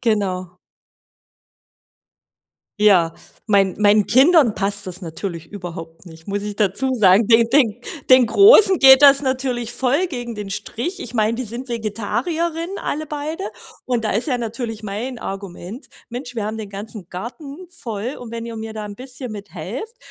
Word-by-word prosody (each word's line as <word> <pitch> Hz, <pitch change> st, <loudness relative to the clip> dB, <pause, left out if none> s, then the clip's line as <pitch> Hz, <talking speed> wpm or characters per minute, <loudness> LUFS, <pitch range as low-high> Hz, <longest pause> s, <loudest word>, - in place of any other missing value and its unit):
genau. 185 Hz, -6 st, -1 dB, 2.2 s
Ja, 180 Hz, -6 st, +4 dB, 0.4 s
mein 195 Hz, -3 st, +3 dB
meinen 205 Hz, 0 st, +4 dB
Kindern 270 Hz, -2 st, +5 dB
passt 200 Hz, 0 st, -1 dB
das 185 Hz, +1 st, -5 dB
natürlich 165 Hz, 0 st, -6 dB
überhaupt 170 Hz, -3 st, -9 dB
nicht, 160 Hz, +2 st, -14 dB
muss 200 Hz, 0 st, -2 dB
ich 210 Hz, -1 st, -4 dB
dazu 215 Hz, +6 st, 0 dB
sagen. 200 Hz, -1 st, +5 dB
Den 230 Hz, 0 st, +5 dB
den 245 Hz, -6 st, +4 dB, 0.3 s
den 255 Hz, -1 st, +7 dB
Großen 395 Hz, -, +7 dB
geht 265 Hz, +1 st, +8 dB
das 275 Hz, -1 st, +8 dB
natürlich 255 Hz, -3 st, -2 dB
voll 265 Hz, +8 st, +1 dB
gegen 240 Hz, -7 st, -6 dB
den 205 Hz, -1 st, -6 dB
Strich. 330 Hz, -, -5 dB
Ich 245 Hz, -, -7 dB
meine, 220 Hz, -1 st, +1 dB
die 255 Hz, -, -3 dB
sind 245 Hz, +3 st, -7 dB
Vegetarierinnen, 310 Hz, -, -3 dB
alle 310 Hz, +1 st, -3 dB
beide, 300 Hz, +2 st, -5 dB, 0.4 s
und 240 Hz, -3 st, -1 dB
da 215 Hz, -, 0 dB
ist 225 Hz, +10 st, -1 dB
ja 250 Hz, -3 st, 0 dB
natürlich 225 Hz, -1 st, -5 dB
mein 230 Hz, +5 st, -5 dB
Argument: 195 Hz, -, -8 dB, 0.2 s
„Mensch, 245 Hz, 0 st, -7 dB
wir 210 Hz, -, -2 dB
haben 215 Hz, +1 st, -4 dB
den 210 Hz, -2 st, -7 dB
ganzen 200 Hz, -2 st, -8 dB
Garten 280 Hz, -, -8 dB
voll 230 Hz, -, -5 dB
und 240 Hz, -2 st, -10 dB
wenn 230 Hz, 0 st, -6 dB
ihr 230 Hz, -, -7 dB
mir 220 Hz, 0 st, -6 dB
da 215 Hz, -1 st, -5 dB
'n 205 Hz, -1 st, -7 dB
bisschen 255 Hz, 0 st, -7 dB
mithelft, 205 Hz, -, -7 dB
230 Hz, 160 wpm, -20 LUFS, 200-260 Hz, 2.2 s, geht